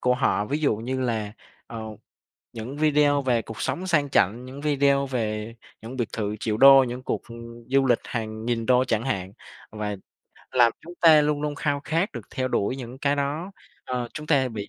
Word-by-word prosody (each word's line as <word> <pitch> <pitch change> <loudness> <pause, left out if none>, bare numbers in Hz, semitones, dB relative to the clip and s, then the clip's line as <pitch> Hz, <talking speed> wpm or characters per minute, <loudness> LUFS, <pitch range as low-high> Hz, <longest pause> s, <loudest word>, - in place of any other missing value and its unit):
của 125 0 +2
họ, 125 -5 +1
ví 145 +7 -1
dụ 145 -8 +1
như 130 +4 -3
là, 110 -5 -2 0.3
ờ, 115 -1 -7 0.7
những 120 +5 -7
video 145 -2 +3
về 120 -4 +1
cuộc 110 - -9
sống 185 - -2
sang 155 -6 +2
chảnh, 110 +2 +2
những 130 +2 -9
video 140 -1 +2
về 110 -3 -3 0.3
những 120 +4 -8
biệt 120 -4 -1
thự 105 -1 -3
triệu 110 -1 -1
đô, 135 +1 +8
những 125 +1 -5
cuộc, - - -3
ừm, 115 0 -10
du 135 0 +3
lịch 120 -2 +3
hàng 110 -2 -5
nghìn 115 -2 -1
đô 125 +1 +4
chẳng 115 -3 0
hạn. 95 -8 -3 0.4
Và 105 -1 -4 0.5
làm 120 -2 +4
chúng 175 +2 -11
ta 160 -3 +7
luôn 150 0 0
luôn 150 -1 -2
khao 145 -1 -1
khát 165 +5 0
được 120 - -5
theo 130 0 -1
đuổi 125 +3 0
những 125 0 -8
cái 145 0 +1
đó, 150 +7 -2 0.3
ờ, 125 -1 -3
chúng 155 -1 -6
ta 135 -4 +3
bị 105 -3 -6
130 Hz, 205 wpm, -25 LUFS, 115-145 Hz, 0.7 s, đô